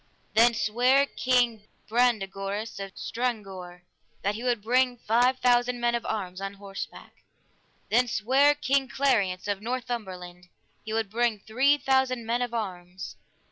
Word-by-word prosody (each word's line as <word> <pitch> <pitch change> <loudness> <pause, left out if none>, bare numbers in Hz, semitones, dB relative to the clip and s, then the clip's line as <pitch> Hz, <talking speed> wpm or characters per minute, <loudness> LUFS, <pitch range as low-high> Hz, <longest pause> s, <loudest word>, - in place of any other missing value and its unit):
Then 235 +2 +5
sware 250 +6 +3
King 245 -6 +1 0.2
Brandegoris 210 -3 0
of 195 -1 -7
Stranggore 195 -7 -4 0.4
that 200 +1 +1
he 220 - -6
would 240 -4 0
bring 250 +2 +2
five 245 +3 +2
thousand 245 0 +2
men 240 0 +1
of 235 - -2
arms 190 -3 -4
on 195 0 -5
horseback. 195 -1 -8 0.7
Then 245 +3 +4
sware 265 +7 +3
King 275 -2 +1
Clariance 205 -10 +1
of 200 -1 -2
Northumberland 205 -8 -5 0.4
he 215 - -7
would 220 -2 -1
bring 235 -1 +1
three 260 +8 +2
thousand 265 -4 +1
men 235 +2 0
of 245 -1 -1
arms. 185 -5 -5
230 Hz, 140 wpm, -27 LUFS, 200-250 Hz, 0.7 s, Then